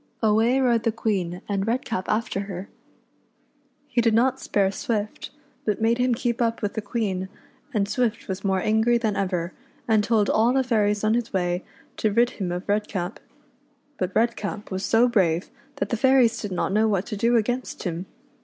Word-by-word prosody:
Away 225 +4 +3
rode 240 -3 +3
the 230 - +1
Queen 190 -6 -2
and 200 0 -1
Redcap 230 -5 -2
after 215 -2 0
her. 190 +1 -6 1.2
He 255 -4 +1
did 230 -2 +3
not 260 +3 +3
spare 195 -2 +1
Swift, 210 +1 -3 0.3
but 210 -2 -1
made 230 +2 +2
him 250 -1 +2
keep 235 0 -1
up 230 -1 0
with 205 - -1
the 220 - -3
Queen, 200 -3 -2 0.4
and 205 -5 0
Swift 230 0 -1
was 190 -1 -4
more 190 -1 +1
angry 220 +4 +3
than 220 -3 -1
ever, 185 -2 -1 0.3
and 220 -2 +3
told 215 -2 +2
all 230 +3 +3
the 265 0 +3
fairies 210 -4 +1
on 215 0 +3
his 235 -1 -1
way 180 -1 -1 0.3
to 215 - +1
rid 235 +3 +3
him 180 -2 -1
of 180 +2 -4
Redcap. 205 -2 -2 0.8
But 185 0 -2
Redcap 215 -3 -1
was 190 +1 -3
so 230 +2 +4
brave 180 -7 +1 0.2
that 280 - -2
the 235 - 0
fairies 250 -2 +4
did 205 - -5
not 180 - -1
know 215 +2 +3
what 200 -2 0
to 215 - -5
do 235 +4 +2
against 245 +3 -1
him. 175 0 -4
215 Hz, 185 wpm, -24 LUFS, 195-235 Hz, 1.2 s, so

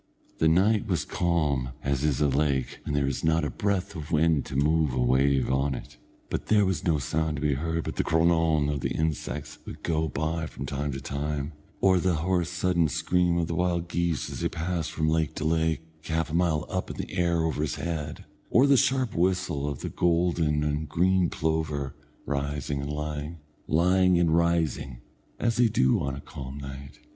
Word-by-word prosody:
The 80 - +4
night 100 +7 +3
was 90 -6 0
calm 75 -8 0
as 70 0 0
is 75 -3 +1
a 75 - +4
lake 70 -2 0
when 75 - -2
there 70 -1 +2
is 70 -2 -2
not 80 0 +2
a 70 - -2
breath 100 +1 -1
of 75 -3 -6
wind 80 -2 +3
to - - -6
move 75 0 +2
a - - 0
wave 65 +2 +3
on 70 +1 +1
it, - - -10 0.3
and - - -1
there 105 -2 +4
was 95 -5 -1
no 80 -4 +2
sound 75 +3 -1
to 70 - -5
be 75 -1 +2
heard 80 +4 -2
but - - -5
the - - +2
cronawn 80 -2 +3
of 75 -1 -1
the - - -1
insects 80 -1 -3
that - - -30
would - - -9
go 80 -1 0
by 80 +2 -2
from - - -7
time 70 +1 -2
to 65 - -4
time, 70 +2 -3 0.3
or 95 -1 +5
the 90 0 +1
hoarse 85 +2 0
sudden 90 -2 +1
scream 90 +3 +1
of 85 - +1
the 85 - -4
wild 85 0 0
geese, 85 -3 -1
as - - -6
they - - 0
passed 85 -1 -2
from 80 -1 -1
lake 80 -1 +1
to - - -3
lake, 80 0 +1 0.2
half 80 -1 -1
a - - -7
mile 85 -3 +1
up - - -3
in - - -6
the - - -5
air 85 -2 +2
over 80 -2 -1
his 75 -5 -1
head; 80 -3 -4 0.2
or 125 +4 +5
the 140 -1 +5
sharp 130 -3 +2
whistle 90 -5 0
of 70 - -5
the - - -3
golden 85 -3 +1
and 75 0 -2
green 90 +3 +2
plover, 80 -4 -1 0.3
rising 70 0 -2
and 70 +1 -4
lying, 75 +2 -4 0.3
lying 90 +2 +4
and 85 -2 +3
rising, 85 -6 +1 0.4
as 115 -1 +1
they 120 -1 +5
do 65 - +3
on 70 -1 -2
a 70 - -7
calm 65 0 -8
night. 70 -1 -8
80 Hz, 205 wpm, -27 LUFS, 70-85 Hz, 0.4 s, or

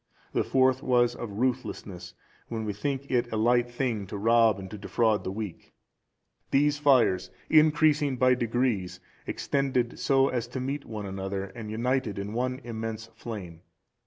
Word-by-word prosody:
The - - +2
fourth 130 0 +3
was 120 -1 +3
of 120 -2 -6
ruthlessness 105 -8 -3 0.3
when 110 -2 -4
we 105 - -2
think 140 +6 -3
it 120 -1 +1
a 110 - -1
light 120 +2 +3
thing 120 -5 -2
to 100 - -5
rob 115 0 +4
and 95 -1 -7
to 105 - -6
defraud 110 0 +1
the 95 - -3
weak. 105 -3 -7 0.8
These 145 +1 +2
fires, 130 -10 +3 0.2
increasing 150 -3 +4
by 130 0 +5
degrees, 115 -7 -1 0.3
extended 130 -4 -1
so 135 0 +3
as 120 -3 -2
to 130 - -5
meet 140 +3 -3
one 105 -2 -6
another, 95 0 -3
and 110 -1 -7
united 120 -1 -1
in 100 +2 -4
one 125 +3 -2
immense 115 -1 -5
flame. 90 -8 -8
120 Hz, 160 wpm, -28 LUFS, 105-130 Hz, 0.8 s, by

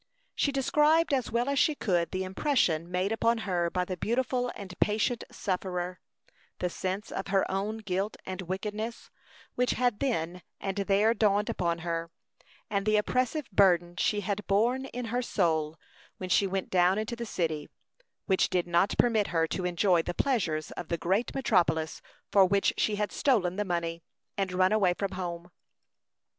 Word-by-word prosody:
She 285 - +1
described 300 +4 +3
as 260 -3 0
well 235 +2 +1
as 280 -1 +1
she 305 - +3
could 175 -9 0
the 190 0 -2
impression 185 - +1
made 180 +3 0
upon 230 +1 +2
her 175 -3 0
by 180 +1 -1
the 185 - -4
beautiful 245 +3 -1
and 195 -3 -8
patient 220 +3 +1
sufferer; 180 -2 -3 0.6
the 180 - -2
sense 190 +5 -4
of 190 - -4
her 195 0 +2
own 200 +3 -2
guilt 200 -1 -2
and 185 0 -5
wickedness, 210 +5 -5 0.4
which 250 0 +1
had 245 -4 +1
then 180 -10 -1 0.2
and 195 0 -3
there 200 +3 +3
dawned 210 -2 +2
upon 170 -1 -1
her; 165 0 -2 0.6
and 200 0 -1
the 215 0 +4
oppressive 255 +7 0
burden 175 -3 +3
she 205 +3 +1
had 205 +1 -3
borne 235 +7 +2
in 250 -2 -5
her 250 - +1
soul 160 -8 0 0.4
when 185 - -6
she 200 - +4
went 190 0 -3
down 180 +1 +4
into 220 +2 -2
the 235 - -5
city, 160 -6 -2 0.6
which 190 -2 +2
did 180 -1 +1
not 175 +3 +2
permit 225 -4 +3
her 165 -1 +1
to 185 - -2
enjoy 180 0 +3
the 175 +1 -5
pleasures 170 - 0
of 175 - -7
the 170 - -1
great 195 +8 0
metropolis 170 -11 +1 0.3
for 195 - +6
which 195 +1 +2
she 215 - +1
had 210 0 -1
stolen 200 -10 +1
the 210 - 0
money, 170 -3 -2 0.3
and 195 -2 -1
run 185 +1 +3
away 195 -5 +3
from 200 0 -2
her 185 - -7
home. 175 -1 -5
195 Hz, 175 wpm, -29 LUFS, 180-225 Hz, 0.6 s, for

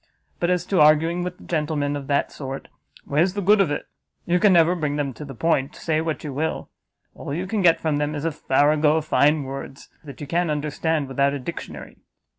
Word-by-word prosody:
But 175 - 0
as 180 -1 +1
to 185 -4 +2
arguing 160 +4 +4
with 180 0 -7
gentlemen 150 -3 -1
of 140 -2 -6
that 140 -1 0
sort, 135 -1 -7 0.4
where's 170 +7 +1
the - - -1
good 205 +2 +5
of 185 - +2
it? 145 - -3 0.4
You 175 +1 +2
can 210 0 +5
never 170 -1 +5
bring 150 -5 -2
them 145 -2 -2
to 150 - -9
the 135 -3 -9
point, 145 +1 0
say 155 -1 -1
what 160 -1 -3
you 145 -3 -5
will; 160 +4 -3 0.4
all - - -8
you 180 +3 -3
can 205 +2 -1
get 170 -3 +5
from 155 -2 0
them, 150 +1 -1
is 145 +1 -4
a 165 - +1
farrago 150 +2 +2
of 155 - -2
fine 150 0 +3
words, 135 0 -8
that 140 -4 -11
you 145 - -6
can't 170 +4 0
understand 150 0 -1
without 140 +1 +1
a - - -4
dictionary." 125 - -8
150 Hz, 220 wpm, -23 LUFS, 145-170 Hz, 0.4 s, good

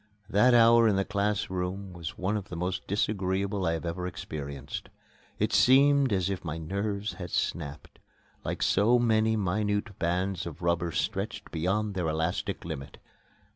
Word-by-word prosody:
That 120 +5 +5
hour 115 0 +7
in 105 - +3
the 95 0 +1
class 100 0 -1
room 95 +1 -3
was 85 -2 -6
one 95 +4 -1
of 100 -3 -4
the 90 - -6
most 90 +2 -3
disagreeable 100 -1 0
I 85 - +1
ever 85 +2 -3
experienced. 70 -5 -6 0.5
It - - 0
seemed 140 0 +5
as 95 -3 +1
if 100 -2 -3
my 80 -2 -4
nerves 100 +5 -3
had 90 - -5
snapped, 75 -3 -3 0.4
like - - -2
so 110 +5 +4
many 110 -2 +3
minute 105 +1 -1
bands 90 +1 -1
of 85 +1 -9
rubber 85 0 +1
stretched 105 +5 -3
beyond 95 +6 0
their 90 -3 -1
elastic 80 +2 -2
limit. 70 +1 -6
95 Hz, 155 wpm, -28 LUFS, 85-105 Hz, 0.5 s, hour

